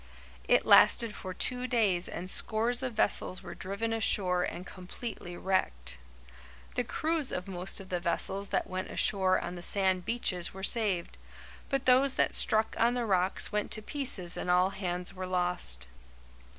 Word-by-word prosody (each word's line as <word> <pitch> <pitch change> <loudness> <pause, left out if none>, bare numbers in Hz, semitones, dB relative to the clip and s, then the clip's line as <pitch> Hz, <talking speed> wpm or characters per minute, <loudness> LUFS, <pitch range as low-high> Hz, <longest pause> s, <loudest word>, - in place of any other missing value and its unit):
It - - +3
lasted 230 -3 +5
for 185 - -7
two 250 +6 -3
days 205 -8 +3
and 180 - -6
scores 230 +5 +2
of 255 -3 -4
vessels 195 -3 0
were - - -8
driven 200 +4 -4
ashore 190 -5 +2
and 180 0 -4
completely 185 -1 -8
wrecked. 65 - -2 0.7
The 245 - 0
crews 310 +4 -2
of 180 +2 -4
most 185 +1 -4
of 190 -1 -11
the 180 - -1
vessels 190 +3 0
that - - -1
went 185 0 -5
ashore 190 -2 +2
on 175 - -5
the 175 - -8
sand 190 0 +2
beaches 190 -5 -1
were 190 - -8
saved, 200 -6 0 0.5
but 275 -1 -1
those 260 +2 +4
that - - +1
struck 220 0 +3
on 235 +2 +3
the 245 -1 -1
rocks 190 -2 +1
went 210 -1 -1
to 215 - -5
pieces 230 - -3
and - - -4
all 180 +2 +3
hands 180 -1 -4
were 185 -1 -6
lost. 175 - +1
190 Hz, 165 wpm, -30 LUFS, 180-230 Hz, 0.7 s, lasted